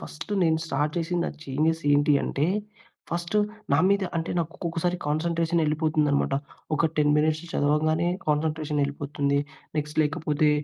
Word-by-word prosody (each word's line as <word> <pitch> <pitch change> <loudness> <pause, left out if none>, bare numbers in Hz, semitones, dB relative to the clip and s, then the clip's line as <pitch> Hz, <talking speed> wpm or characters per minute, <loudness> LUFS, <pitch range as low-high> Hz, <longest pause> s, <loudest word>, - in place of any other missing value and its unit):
First 165 +6 -8
నేను 160 -2 +3
start 150 0 -1
చేసింది, 170 +1 -1
నా - - -2
చేంజెస్ 155 +4 0
ఏంటి 145 +1 +4
అంటే, 145 +3 0 0.6
ఫస్ట్ 170 +4 -2 0.4
నా - - +5
మీద 200 0 +3
అంటే, 165 0 -2
నాకు 165 -1 -1
ఒక్కొక్కసారి 175 0 -1
కాన్సంట్రేషనెళ్ళిపోతుందనమాట. 155 -2 +1 0.4
ఒక 160 +2 +2
10 150 0 +4
మినిట్స్ 155 +1 +1
చదవగానే, 155 +3 +2 0.2
కాన్సంట్రేషన్ 150 0 0
ఎళ్ళిపోతుంది. 140 0 -1 0.4
నెక్స్ట్ 150 +1 -1
లేకపోతే, 150 0 +1
155 Hz, 130 wpm, -26 LUFS, 150-165 Hz, 0.6 s, నా